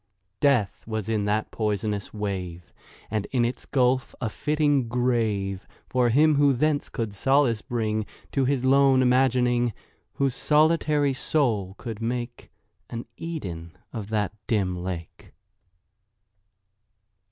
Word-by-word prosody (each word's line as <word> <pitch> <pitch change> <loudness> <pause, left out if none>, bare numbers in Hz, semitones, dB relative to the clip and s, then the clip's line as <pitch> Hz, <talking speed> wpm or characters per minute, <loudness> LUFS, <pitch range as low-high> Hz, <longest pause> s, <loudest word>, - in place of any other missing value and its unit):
Death 130 -8 +2
was 110 -2 -3
in 105 -2 0
that 105 +1 0
poisonous 105 -2 -2
wave, 95 -5 -5 0.4
And 105 -2 -1
in 125 -3 +1
its 120 - -4
gulf 130 -1 +1
a 115 -4 -2
fitting 145 -3 +1
grave 110 -6 0 0.2
For 125 -2 +2
him 150 +5 +4
who 145 -1 +5
thence 145 +3 0
could 110 -3 -3
solace 130 0 +2
bring 110 -3 -2 0.2
To 135 -2 +1
his 130 -1 0
lone 135 -1 +5
imagining— 125 -2 +3 0.4
Whose 135 -2 0
solitary 150 -1 +2
soul 115 -9 0
could 115 -2 -7
make 120 +1 -4 0.4
An 115 0 -5
Eden 90 - -6 0.2
of 110 -3 -5
that 105 -3 -1
dim 95 -5 +1
lake. 90 -2 -7
120 Hz, 120 wpm, -25 LUFS, 105-135 Hz, 0.4 s, who